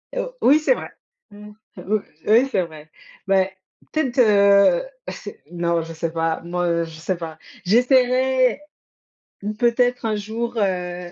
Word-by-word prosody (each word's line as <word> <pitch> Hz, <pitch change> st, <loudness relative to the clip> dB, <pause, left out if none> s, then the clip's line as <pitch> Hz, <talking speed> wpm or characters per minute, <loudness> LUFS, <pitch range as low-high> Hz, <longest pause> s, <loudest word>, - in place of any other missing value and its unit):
Heu, -, -, -2 dB
oui, 285 Hz, +4 st, +5 dB
c'est 310 Hz, +11 st, +3 dB
vrai. -, -, -7 dB, 0.4 s
Mmh. 210 Hz, +1 st, -12 dB, 0.3 s
Oui, 215 Hz, +2 st, -1 dB, 0.3 s
oui 235 Hz, +6 st, +4 dB
c'est 185 Hz, -6 st, +1 dB
vrai. 155 Hz, -2 st, -11 dB, 0.4 s
Mais, 190 Hz, -1 st, +1 dB, 0.3 s
peut-être, 270 Hz, -5 st, -1 dB
heu, 205 Hz, -, +5 dB, 0.2 s
c'est 205 Hz, -, -9 dB
non, 170 Hz, -1 st, 0 dB
je 165 Hz, 0 st, -8 dB
sais 165 Hz, 0 st, -3 dB
pas, 165 Hz, 0 st, -1 dB
moi 170 Hz, -1 st, -1 dB
je 160 Hz, -1 st, -11 dB
sais 180 Hz, +2 st, -2 dB
pas. 160 Hz, -2 st, -7 dB, 0.3 s
J'essaierais, 255 Hz, +4 st, +3 dB, 1.0 s
peut-être 245 Hz, 0 st, +1 dB
un 220 Hz, -1 st, 0 dB
jour, 230 Hz, +3 st, -4 dB
heu 180 Hz, -3 st, -2 dB
205 Hz, 140 wpm, -21 LUFS, 175-245 Hz, 1.0 s, oui